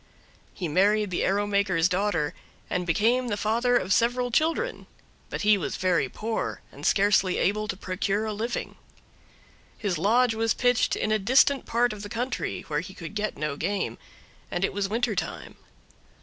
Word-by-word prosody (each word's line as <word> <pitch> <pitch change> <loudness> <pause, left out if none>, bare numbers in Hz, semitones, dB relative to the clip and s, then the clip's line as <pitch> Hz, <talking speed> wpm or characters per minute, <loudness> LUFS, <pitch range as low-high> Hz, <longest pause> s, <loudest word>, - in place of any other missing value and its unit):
He 180 - -4
married 200 +5 +2
the 175 - 0
arrow 200 +2 +1
maker's 200 -5 +2
daughter, 180 -5 0 0.4
and 180 0 -1
became 235 +9 +2
the 205 -3 -1
father 235 +4 +2
of 185 -2 0
several 245 +3 +1
children, 330 - 0 0.4
but - - -4
he 210 -1 +5
was - - -3
very 175 -8 +1
poor 220 - -3
and - - -4
scarcely 195 -2 +3
able 215 +2 0
to 190 - -3
procure 195 +3 -1
a 215 - -2
living. 230 +4 -4 1.0
His 190 -7 -2
lodge 225 +6 +3
was 225 0 0
pitched 245 -1 +2
in 215 - -1
a 215 - +2
distant 260 +6 +3
part 240 0 +2
of 210 - -9
the 205 - -7
country, 245 +4 -3
where 150 -1 -2
he 185 +4 -8
could 165 +3 -8
get 210 0 -2
no 150 -1 -2
game, 200 +5 -2 0.5
and 175 - 0
it - - -3
was 195 0 -1
winter 230 +1 0
time. - - -5
205 Hz, 175 wpm, -26 LUFS, 185-230 Hz, 1.0 s, he